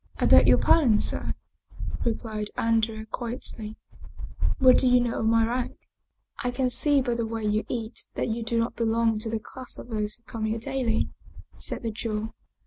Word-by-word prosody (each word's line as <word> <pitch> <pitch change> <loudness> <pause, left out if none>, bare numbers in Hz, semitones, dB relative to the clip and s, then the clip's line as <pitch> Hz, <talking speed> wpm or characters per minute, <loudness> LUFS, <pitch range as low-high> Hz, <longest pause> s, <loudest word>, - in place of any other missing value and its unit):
" - - -24
I - - +1
beg - - +7
your - - +7
pardon, 245 -10 +4
sir," - - 0 0.7
replied 220 -2 -2
Andrea 225 -1 +1
quietly. 225 -1 -5 0.4
" - - -3
What 255 -2 +6
do 260 - +3
you 250 0 +6
know 240 -1 -1
of 220 - 0
my 225 0 +4
rank? 245 +2 -2 0.2
" - - -53
" - - -12
I 250 - +1
can 250 +1 0
see 285 +2 +4
by 245 -2 0
the 235 0 -1
way 225 0 -4
you 210 +1 +1
eat 230 -1 -4
that - - -1
you 225 +1 -2
do 230 +1 -1
not 230 +1 0
be 235 - -1
long 225 -1 +2
to 225 +1 -3
the 225 - -1
class 255 +4 -9
of - - -10
those 215 -2 -2
who 235 - -27
come 225 -1 -4
here 220 +1 -1
daily," 235 -1 -1 0.5
said - - -3
the 225 - -1
Jew. 215 0 -4
230 Hz, 215 wpm, -26 LUFS, 220-245 Hz, 0.7 s, beg